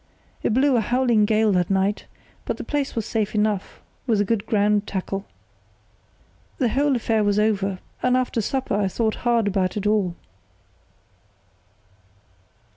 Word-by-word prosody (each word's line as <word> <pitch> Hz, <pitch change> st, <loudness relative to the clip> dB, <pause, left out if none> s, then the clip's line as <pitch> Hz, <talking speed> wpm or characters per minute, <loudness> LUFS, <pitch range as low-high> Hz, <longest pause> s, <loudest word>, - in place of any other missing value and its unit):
It -, -, 0 dB
blew 265 Hz, 0 st, +3 dB
a -, -, +3 dB
howling 240 Hz, -1 st, +2 dB
gale 215 Hz, 0 st, +2 dB
that 180 Hz, -3 st, +1 dB
night, 195 Hz, +1 st, 0 dB, 0.4 s
but -, -, -2 dB
the -, -, -6 dB
place 290 Hz, -2 st, -2 dB
was 225 Hz, -3 st, -2 dB
safe 215 Hz, -2 st, -2 dB
enough, 210 Hz, -2 st, -1 dB, 0.3 s
with 210 Hz, -4 st, +2 dB
good 220 Hz, 0 st, -1 dB
ground 210 Hz, -1 st, +2 dB
tackle. 195 Hz, +1 st, -4 dB, 1.3 s
"The 250 Hz, -4 st, +1 dB
whole 275 Hz, +4 st, +2 dB
affair 225 Hz, -2 st, +1 dB
was 205 Hz, 0 st, +1 dB
over; 200 Hz, -3 st, +1 dB, 0.2 s
and 250 Hz, 0 st, +3 dB
after 250 Hz, -2 st, 0 dB
supper 265 Hz, +3 st, -2 dB
I 200 Hz, -1 st, +1 dB
thought 220 Hz, +3 st, 0 dB
hard 235 Hz, -3 st, +2 dB
about 190 Hz, -1 st, 0 dB
it 205 Hz, -, -3 dB
all." 205 Hz, -5 st, +1 dB
215 Hz, 145 wpm, -23 LUFS, 200-235 Hz, 1.3 s, blew